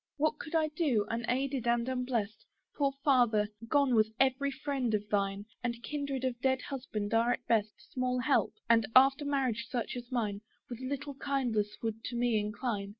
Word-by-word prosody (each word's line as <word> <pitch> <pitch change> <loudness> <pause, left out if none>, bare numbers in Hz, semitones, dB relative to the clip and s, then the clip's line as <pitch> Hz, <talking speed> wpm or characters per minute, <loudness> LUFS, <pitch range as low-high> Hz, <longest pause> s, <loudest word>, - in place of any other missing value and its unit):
What 305 +1 +1
could 320 - -5
I 315 -1 +3
do, 295 -9 +1
unaided 250 +2 -1
and 235 0 +2
unblest? 250 -5 -2 0.3
Poor 280 -2 +2
Father! 240 -7 +4 0.2
gone 280 0 +3
was 220 -1 +4
every 270 +1 +3
friend 270 -4 -1
of 210 0 -3
thine: 200 0 0 0.2
And 235 -1 -3
kindred 280 -2 -3
of 250 -2 -2
dead 260 -1 +2
husband 225 -6 -4
are 230 +2 +4
at 245 - -6
best 215 -2 -1
Small 255 -1 0
help, 265 +3 +2
and, 230 -1 +4
after 270 +3 +6
marriage 260 -4 0
such 240 -2 -2
as 245 0 -7
mine, 210 -5 -1 0.3
With 240 - -5
little 280 +2 -4
kindness 245 -7 -1
would 225 0 -3
to 245 - -4
me 240 -2 +2
incline. 210 -1 -3
245 Hz, 175 wpm, -31 LUFS, 225-270 Hz, 0.3 s, after